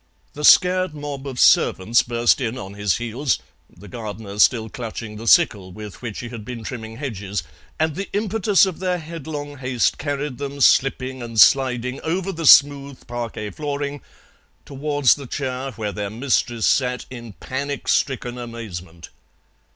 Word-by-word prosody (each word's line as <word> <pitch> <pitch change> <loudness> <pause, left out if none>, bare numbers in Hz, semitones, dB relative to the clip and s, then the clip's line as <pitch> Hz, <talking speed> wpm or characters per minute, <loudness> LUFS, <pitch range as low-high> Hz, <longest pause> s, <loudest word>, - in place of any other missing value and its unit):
The 150 - -7
scared 180 +1 +5
mob 145 -2 -6
of 130 -3 -6
servants 115 +6 +4
burst 120 +2 +2
in 120 0 -2
on 95 -5 -7
his 100 -2 0
heels, 120 +3 -1 0.3
the 105 - -15
gardener 105 -1 -7
still 110 0 +4
clutching 110 -1 -7
the 115 +2 -8
sickle 105 - +4
with 105 +1 -10
which 115 -4 -5
he 120 - -7
had 115 -3 -8
been 115 0 -7
trimming 110 -1 -7
hedges, 105 - -4 0.4
and 160 0 +1
the 195 +5 -5
impetus 205 -1 +2
of 185 -4 -5
their 180 -1 0
headlong 150 -3 -7
haste 125 -2 0
carried 145 -2 -3
them, 140 0 -5
slipping 130 -1 +2
and 115 -2 -4
sliding, 125 0 +4
over 185 +4 -2
the 165 -4 -2
smooth 140 -1 +5
parquet 115 -3 -5
flooring 145 +2 -4 0.6
towards 145 -1 +2
the 140 -3 -8
chair 130 0 -3
where 105 -2 -4
their 100 -1 -4
mistress 120 0 0
sat 125 -1 +1
in 120 -4 -9
panic 140 +6 -5
stricken 125 -2 0
amazement. 95 -9 -8
125 Hz, 155 wpm, -22 LUFS, 115-145 Hz, 0.6 s, scared